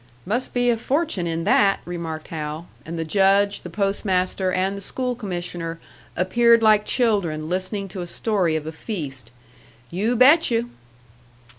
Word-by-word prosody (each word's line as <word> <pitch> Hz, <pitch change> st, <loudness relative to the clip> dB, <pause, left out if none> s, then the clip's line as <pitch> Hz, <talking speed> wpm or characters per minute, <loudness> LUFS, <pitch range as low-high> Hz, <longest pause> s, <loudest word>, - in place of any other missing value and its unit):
"Must 240 Hz, +7 st, -1 dB
be 245 Hz, 0 st, +3 dB
a 230 Hz, -, 0 dB
fortune 265 Hz, -, -1 dB
in 165 Hz, 0 st, -2 dB
that!" 195 Hz, +3 st, +3 dB
remarked 165 Hz, -3 st, -6 dB
Hal; 155 Hz, +1 st, -5 dB, 0.2 s
and 165 Hz, +1 st, -5 dB
the 165 Hz, -, -2 dB
Judge, 200 Hz, +3 st, +3 dB
the 175 Hz, -, -8 dB
Post 195 Hz, +3 st, -1 dB
master 185 Hz, -1 st, 0 dB
and 190 Hz, +2 st, 0 dB
the 200 Hz, -, -7 dB
School 250 Hz, +5 st, -2 dB
commissioner 175 Hz, -6 st, -5 dB, 0.4 s
appeared 230 Hz, +5 st, +4 dB
like 215 Hz, -1 st, +5 dB
children 195 Hz, -11 st, +1 dB
listening 190 Hz, +3 st, -2 dB
to 185 Hz, -, -6 dB
a 175 Hz, -, -5 dB
story 185 Hz, -4 st, 0 dB
of 155 Hz, -1 st, -3 dB
a 160 Hz, -, -4 dB
feast. 150 Hz, -, -6 dB, 0.6 s
"You 210 Hz, +8 st, 0 dB
bet 285 Hz, +7 st, +6 dB
you!" 235 Hz, 0 st, -1 dB
195 Hz, 160 wpm, -23 LUFS, 170-225 Hz, 0.6 s, bet